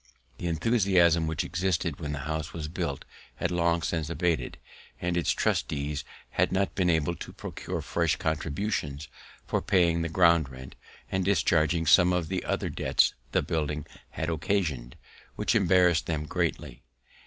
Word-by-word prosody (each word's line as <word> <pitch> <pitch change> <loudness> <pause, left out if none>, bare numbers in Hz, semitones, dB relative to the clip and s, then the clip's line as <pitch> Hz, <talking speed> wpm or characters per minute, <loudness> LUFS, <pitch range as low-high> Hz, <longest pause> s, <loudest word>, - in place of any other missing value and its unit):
The 90 - -3
enthusiasm 85 -2 +3
which 80 +1 -1
existed 85 -3 -1
when 75 -3 -4
the 70 -1 -4
house 80 -1 -3
was 80 -2 -4
built 80 -4 -4 0.3
had 90 - -2
long 85 -1 +1
since 80 -2 -2
abat'd, 85 -1 -1 0.4
and 85 0 -1
its 85 - 0
trustees 75 0 0 0.3
had - - +1
not 95 +1 0
been 90 -2 +1
able 80 0 +1
to - - -8
procure - - -5
fresh - - +1
contributions 75 - -2 0.4
for - - -1
paying 85 -3 +2
the 85 - -2
ground 85 -4 +4
rent, 65 0 -10 0.4
and 95 0 0
discharging 85 -3 +2
some 90 +4 +6
other 90 +1 -1
debts - - +2 0.2
the - - +2
building 75 -2 -2 0.2
had 80 +1 -3
occasion'd, 80 -8 -1 0.4
which - - 0
embarrass'd 90 -6 +4
them 75 -2 -2
greatly. 70 -3 -2
85 Hz, 145 wpm, -28 LUFS, 75-90 Hz, 0.4 s, some